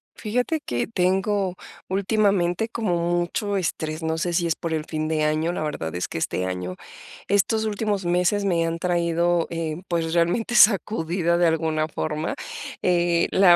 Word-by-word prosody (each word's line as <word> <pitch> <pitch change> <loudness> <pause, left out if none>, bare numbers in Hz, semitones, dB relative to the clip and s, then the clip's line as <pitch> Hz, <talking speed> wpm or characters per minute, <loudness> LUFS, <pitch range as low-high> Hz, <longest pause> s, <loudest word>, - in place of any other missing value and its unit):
Fíjate 250 +8 -1
que 120 - -2
tengo 190 -1 +1 0.3
últimamente 195 0 +1
como 220 -6 -1 0.2
mucho 200 +4 -2
estrés, 160 -3 -2
no 160 0 -1
sé 175 +1 -1
si 170 0 +1
es 165 - +1
por 165 -2 -3
el 155 -1 -1
fin 155 -1 -3
de 155 -1 0
año, 155 +3 +1
la 165 - -2
verdad 90 - -4
es 90 - -2
que - - -5
este 90 +2 -1
año 90 0 -4 0.5
estos 210 +3 +2
últimos 205 -2 -1
meses 180 +4 +2
me 170 -4 +2
han 165 0 -2
traído, 170 -1 +1
eh, 165 -1 -3
pues, 165 -2 -1
realmente 175 +8 +1
sacudida 175 -5 +4
de 175 0 +4
alguna 160 -1 0
forma, 155 0 -3 0.5
eh, 175 -1 +2
la 185 -3 +6
175 Hz, 165 wpm, -24 LUFS, 160-195 Hz, 0.5 s, la